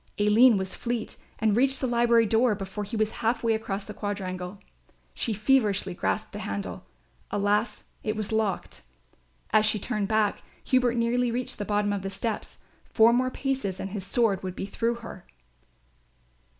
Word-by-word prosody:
Aline 210 +3 +6
was 190 0 -3
fleet 235 -2 -3 0.2
and 215 -2 +2
reached 265 +3 +3
the - - -1
library 235 -1 +4
door 225 +1 +3
before 195 +1 -5
he 220 +3 -5
was 215 0 +1
half 230 +1 +1
way 230 -1 +3
across 205 -2 -3
the 210 - -7
quadrangle. 185 -2 -4 0.6
She 230 - -1
feverishly 210 -4 +2
grasped 215 +4 -2
the 205 - -6
handle. 200 -1 -5 0.4
Alas, 205 +3 0 0.2
it 215 0 -2
was 215 -1 -3
locked. 220 -2 -1 0.7
As 215 -1 +5
she 215 0 +2
turned 210 -1 -2
back, 215 -1 +1 0.2
Hubert 250 -2 +2
nearly 240 +1 +1
reached 240 0 -3
the 205 - -2
bottom 205 0 +1
of 200 - -2
the 195 - -4
steps. 205 +2 -4 0.3
Four 225 +1 +5
more 255 +1 +2
paces 260 -9 -2
and 195 - -4
his 200 -2 -4
sword 200 -1 +1
would 185 -1 -5
be - - -4
through 230 +4 -1
her. - - -9
215 Hz, 170 wpm, -27 LUFS, 200-235 Hz, 0.7 s, Aline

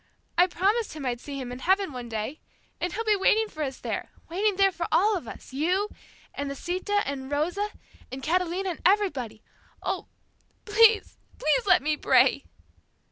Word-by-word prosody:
I 355 +1 +5
promised 405 +6 0
him 300 -3 -6
I'd 240 -1 -2
see 280 -1 -6
him 250 -2 -5
in 250 - -6
heaven 380 +4 +2
one 245 -2 -7
day, 225 +7 -4 0.4
and 355 - -1
he'll 450 +5 -3
be 430 -2 +3
waiting 430 +3 +3
for 310 -7 -8
us 270 -3 -2
there, - - -4 0.2
waiting 400 +4 +1
there 390 0 +4
for 345 -2 -3
all 405 +7 +4
of 330 -11 -5
us, - - -10
you, 365 +9 +1 0.4
and 285 0 -4
Lisita, 370 +8 -1
and 270 -1 -4
Rosa, 350 +8 0 0.4
and 265 +1 -7
Catalina, 365 +3 0
and 335 - -8
everybody. 290 - +1 0.4
Oh, - - -2 0.6
please, 435 0 +4 0.2
please - - +1
let 360 -7 +5
me 305 0 +1
pray!" - - +4
355 Hz, 175 wpm, -27 LUFS, 280-405 Hz, 0.6 s, I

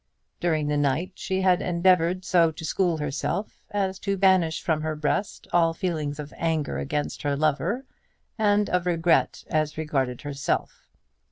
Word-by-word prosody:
During 160 -3 +1
the 150 0 +1
night 145 +6 0
she 190 +1 -2
had 185 -1 +3
endeavoured 180 0 +2
so 170 -2 +4
to 160 +1 -8
school 175 +1 +1
herself 150 +7 -3
as 195 -2 -1
to 200 -1 -1
banish 185 -4 +3
from 160 -2 0
her 155 0 -2
breast 150 +6 -2
all 165 -1 +3
feelings 155 -6 -2
of 150 -1 -7
anger 160 -3 -1
against 145 +1 -3
her 145 -1 0
lover, 155 - 0 0.5
and 210 -1 +2
of 180 0 0
regret 170 -1 +2
as 155 -1 0
regarded 135 -5 -1
herself. 140 -1 -3
165 Hz, 155 wpm, -25 LUFS, 150-185 Hz, 0.5 s, so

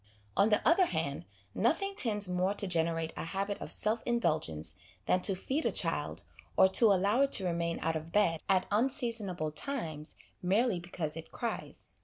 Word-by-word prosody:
On 205 - +4
the 210 - +2
other 355 +2 +5
hand, 140 - -3 0.3
nothing 330 - +1
tends 210 - +1
more 180 +2 0
to 205 - -2
generate 165 -2 0
a - - -4
habit 195 +4 -3
of - - -6
self 220 +2 0
indul 235 -10 +1
gence 80 -1 -2 0.3
than 180 - +2
to 195 +1 +5
feed 270 - -2
a - - +1
child, - - -1 0.3
or 190 - +7
to 215 +3 +5
allow 200 +6 +2
it 275 0 +2
to 190 - +6
remain 170 -1 -1
out 160 +1 0
of 160 +1 -5
bed, 170 -6 +2
at 185 -1 +3
unseasonable 220 - 0
times, 155 - -4 0.3
merely 195 +2 +1
because 170 -3 -4
it 165 - -9
cries. 235 -1 -5
190 Hz, 180 wpm, -31 LUFS, 165-230 Hz, 0.3 s, or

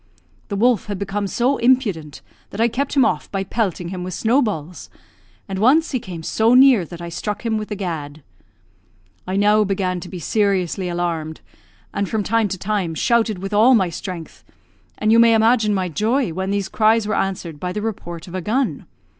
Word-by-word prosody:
The 200 - -4
wolf 235 0 +2
had 205 -2 -3
become 200 +1 -3
so 250 +7 +1
impudent 210 - +1 0.3
that 200 - -9
I 230 - +4
kept 275 +5 -2
him 270 -4 +5
off 150 - -1
by 195 -1 -1
pelting 190 -4 -2
him 180 -1 -5
with 180 -1 -5
snowballs; 210 - -1 0.6
and 190 -1 -4
once 290 +10 +4
he 255 - 0
came 175 -6 -8
so 225 +8 +2
near 255 -8 +6
that 170 +1 -9
I 170 - -5
struck 210 +6 -5
him 225 -1 0
with 215 - -6
the 210 - -3
gad. 155 -6 -5 1.0
I 185 - -2
now 210 +2 +4
began 190 -2 -1
to 175 - -9
be 185 - -7
seriously 190 -1 0
alarmed, 170 -3 -3 0.5
and 200 -1 -2
from 220 -2 -1
time 225 +1 +1
to 190 -1 -4
time, 190 -4 -2
shouted 225 +3 +1
with 195 +3 -6
all 230 +5 +6
my 190 -5 +2
strength; 170 -1 -7 0.5
and 215 0 +1
you 230 - +6
may 230 -1 +6
imagine 225 -1 +3
my 190 -2 0
joy 220 - 0
when 190 +2 -3
these 200 -1 -1
cries 220 +1 +2
were 215 - -1
answered 180 -6 -2
by 180 +2 -3
the 210 +3 -4
report 175 -6 -5
of 175 - -11
a 185 - -3
gun. 245 +8 -1
200 Hz, 195 wpm, -20 LUFS, 180-225 Hz, 1.0 s, near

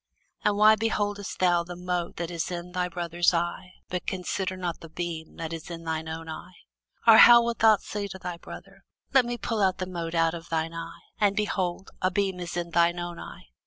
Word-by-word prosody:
And 205 -1 +2
why 215 +1 +7
beholdest 205 -2 -2
thou 175 -2 +3
the 175 +1 -8
mote 180 -1 -3
that 170 0 -4
is 170 0 -3
in 175 0 -6
thy 180 0 -1
brother's 175 0 +1
eye, 175 +2 -3
but 180 -1 -4
considerest 185 0 -2
not 175 -2 -3
the 165 - -11
beam 165 -1 -5
that 165 0 -5
is 165 0 -7
in 165 -1 -7
thine 160 -1 -3
own 160 0 -6
eye? 175 +3 -8 0.5
Or 225 -1 +9
how 235 0 +9
wilt 235 0 -2
thou 220 -1 +6
say 205 0 -5
to 190 -1 -8
thy 180 -2 -6
brother, 195 +3 -12 0.3
Let 265 -2 +6
me 240 0 -3
pull 225 -2 -2
out 190 -1 +2
the 185 - -3
mote 170 -2 -5
out 165 0 +3
of 170 0 -8
thine 165 0 -1
eye; 165 0 -7 0.2
and, 205 -2 +3
behold, 190 -3 -2
a 185 - +3
beam 190 0 -1
is 175 0 -5
in 170 -1 -3
thine 170 +1 +3
own 175 -1 -5
eye? - - -11
180 Hz, 220 wpm, -27 LUFS, 170-195 Hz, 0.5 s, Or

